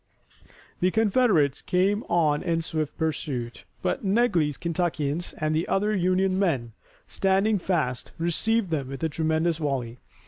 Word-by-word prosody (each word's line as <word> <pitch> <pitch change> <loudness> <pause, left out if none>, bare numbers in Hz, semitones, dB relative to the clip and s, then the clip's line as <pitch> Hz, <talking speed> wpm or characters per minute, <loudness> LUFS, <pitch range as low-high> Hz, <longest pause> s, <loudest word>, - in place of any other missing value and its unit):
The 180 - +3
Confederates 205 - +2
came 195 +4 +1
on 155 -4 +2
in 165 -1 -1
swift 155 -2 -3
pursuit, 140 -7 -3 0.2
but - - -1
Negley's 190 - +2
Kentuckians 170 -2 -2
and 155 0 0
the 160 +2 0
other 210 +2 +1
Union 185 +1 +1
men, 135 -12 0 0.3
standing 195 +2 +1
fast, 155 -9 -1
received 190 +4 +1
them 140 -5 -1
with 135 +3 -7
a 160 - +1
tremendous 160 +2 0
volley. 130 -6 -3
165 Hz, 135 wpm, -26 LUFS, 150-190 Hz, 0.3 s, The